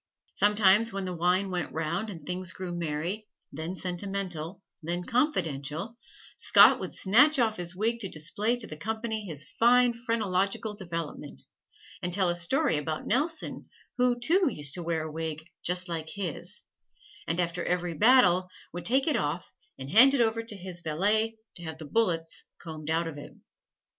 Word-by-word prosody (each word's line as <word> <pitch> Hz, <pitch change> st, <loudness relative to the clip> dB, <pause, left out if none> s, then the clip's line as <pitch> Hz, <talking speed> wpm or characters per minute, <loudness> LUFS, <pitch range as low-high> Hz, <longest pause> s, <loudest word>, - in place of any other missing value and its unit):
Sometimes 210 Hz, +2 st, +4 dB
when 195 Hz, -1 st, -3 dB
the 180 Hz, -1 st, -4 dB
wine 180 Hz, +3 st, +1 dB
went 175 Hz, -3 st, -3 dB
round 170 Hz, +7 st, -2 dB
and 165 Hz, -7 st, -9 dB
things 185 Hz, 0 st, -4 dB
grew 180 Hz, -2 st, -5 dB
merry, 170 Hz, +6 st, -3 dB, 0.2 s
then 160 Hz, +5 st, -5 dB
sentimental, 185 Hz, -1 st, -3 dB, 0.2 s
then 175 Hz, +2 st, -3 dB
confidential, 175 Hz, -, -1 dB, 0.4 s
Scott -, -, +7 dB
would -, -, -5 dB
snatch 255 Hz, +10 st, +5 dB
off 225 Hz, -4 st, +2 dB
his 175 Hz, 0 st, -5 dB
wig 225 Hz, +4 st, 0 dB
to 195 Hz, -4 st, -3 dB
display 205 Hz, +10 st, 0 dB
to 235 Hz, -, -1 dB
the 155 Hz, -, -8 dB
company 220 Hz, +4 st, -3 dB
his 155 Hz, -5 st, -4 dB
fine 245 Hz, +1 st, +4 dB
phrenological 215 Hz, -3 st, -1 dB
development, 170 Hz, -5 st, -6 dB, 0.6 s
and 175 Hz, -, -2 dB
tell 185 Hz, 0 st, +2 dB
a 175 Hz, -, 0 dB
story 175 Hz, -, +2 dB
about 155 Hz, +1 st, -4 dB
Nelson, 305 Hz, +7 st, -1 dB, 0.3 s
who, 245 Hz, -1 st, +3 dB
too, 345 Hz, +9 st, +3 dB
used 145 Hz, -, -5 dB
to 175 Hz, -, -3 dB
wear 165 Hz, -2 st, -1 dB
a 155 Hz, -, -6 dB
wig 160 Hz, 0 st, -5 dB, 0.2 s
just 180 Hz, +1 st, 0 dB
like 160 Hz, -2 st, -4 dB
his, 190 Hz, -6 st, -6 dB, 0.7 s
and 165 Hz, +2 st, -1 dB
after 175 Hz, 0 st, -1 dB
every 180 Hz, -1 st, -1 dB
battle 185 Hz, -, +5 dB, 0.2 s
would 175 Hz, -, -6 dB
take 265 Hz, +3 st, +3 dB
it 310 Hz, -, +1 dB
off 165 Hz, -5 st, -2 dB, 0.2 s
and 135 Hz, +1 st, -7 dB
hand 260 Hz, +8 st, +7 dB
it 255 Hz, -, +2 dB
over 230 Hz, 0 st, +1 dB
to 225 Hz, -2 st, -6 dB
his 180 Hz, -2 st, -7 dB
valet 210 Hz, +8 st, +1 dB, 0.2 s
to 175 Hz, -, -10 dB
have 160 Hz, -1 st, -6 dB
the 160 Hz, -, -8 dB
bullets 165 Hz, -2 st, -1 dB
combed 155 Hz, -2 st, -8 dB
out 165 Hz, +1 st, +1 dB
of 150 Hz, -3 st, -7 dB
it. -, -, -11 dB
185 Hz, 170 wpm, -28 LUFS, 165-220 Hz, 0.7 s, Scott